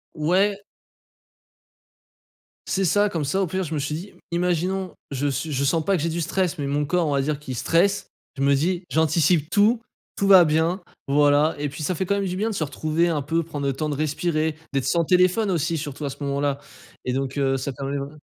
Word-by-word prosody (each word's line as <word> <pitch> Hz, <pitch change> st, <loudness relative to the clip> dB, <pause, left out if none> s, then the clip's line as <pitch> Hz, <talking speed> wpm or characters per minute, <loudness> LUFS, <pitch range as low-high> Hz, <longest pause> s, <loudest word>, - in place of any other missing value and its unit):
Ouais. 195 Hz, +6 st, +1 dB, 2.0 s
C'est 195 Hz, 0 st, 0 dB
ça. 205 Hz, +4 st, +3 dB
Comme 160 Hz, -6 st, -2 dB
ça, 190 Hz, +8 st, 0 dB
au 185 Hz, -, 0 dB
pire, 185 Hz, +3 st, -2 dB
je 160 Hz, -1 st, -5 dB
me 150 Hz, -, -1 dB
suis 145 Hz, +2 st, -2 dB
dit: 185 Hz, +5 st, -8 dB, 0.2 s
«Imaginons 180 Hz, +1 st, -1 dB, 0.2 s
je 140 Hz, +1 st, -1 dB
suis 150 Hz, +3 st, -2 dB
je 140 Hz, 0 st, 0 dB
sens 160 Hz, +3 st, +1 dB
pas 195 Hz, +1 st, +2 dB
que -, -, -3 dB
j'ai 165 Hz, -, 0 dB
du 170 Hz, +1 st, -2 dB
stress 180 Hz, 0 st, -1 dB
mais 145 Hz, -, -3 dB
mon 145 Hz, +1 st, 0 dB
corps 175 Hz, +2 st, +1 dB
on -, -, 0 dB
va 140 Hz, -, +2 dB
dire 150 Hz, 0 st, -2 dB
qu'il 130 Hz, -4 st, -6 dB
stresse». 180 Hz, +10 st, +1 dB, 0.3 s
Je -, -, -4 dB
me 140 Hz, 0 st, +4 dB
dis 175 Hz, +5 st, -1 dB
«J'anticipe 160 Hz, 0 st, +2 dB
tout, 220 Hz, +4 st, +3 dB, 0.3 s
tout 200 Hz, -, 0 dB
va 185 Hz, -3 st, +8 dB
bien. 160 Hz, +5 st, +1 dB, 0.3 s
Voilà» 145 Hz, +2 st, +3 dB
et 145 Hz, -, -1 dB
puis 150 Hz, +2 st, -7 dB
ça 185 Hz, -, 0 dB
fait 185 Hz, +3 st, -2 dB
quand 200 Hz, -, +1 dB
même 200 Hz, -1 st, -1 dB
du 180 Hz, 0 st, -3 dB
bien 220 Hz, +3 st, 0 dB
de 215 Hz, -, -4 dB
se 160 Hz, -, 0 dB
retrouver, 155 Hz, +4 st, 0 dB
un 150 Hz, -3 st, 0 dB
peu, 165 Hz, +4 st, 0 dB
prendre 145 Hz, -3 st, -4 dB
le 135 Hz, -, +1 dB
temps 155 Hz, +3 st, -3 dB
de 145 Hz, -, -2 dB
respirer, 155 Hz, +1 st, -1 dB, 0.2 s
d'être 135 Hz, -2 st, 0 dB
sans 170 Hz, +2 st, +2 dB
téléphone 185 Hz, +4 st, +3 dB
aussi, 165 Hz, 0 st, 0 dB
surtout 145 Hz, 0 st, -5 dB
à -, -, -1 dB
ce 140 Hz, +2 st, -8 dB
moment-là 140 Hz, 0 st, -1 dB, 0.5 s
et 125 Hz, -, 0 dB
donc, 135 Hz, +1 st, -2 dB
heu, 135 Hz, -1 st, +1 dB
ça 135 Hz, +1 st, -4 dB
permet 140 Hz, +2 st, -4 dB
vrai 140 Hz, +2 st, -6 dB
155 Hz, 230 wpm, -23 LUFS, 145-180 Hz, 2.0 s, va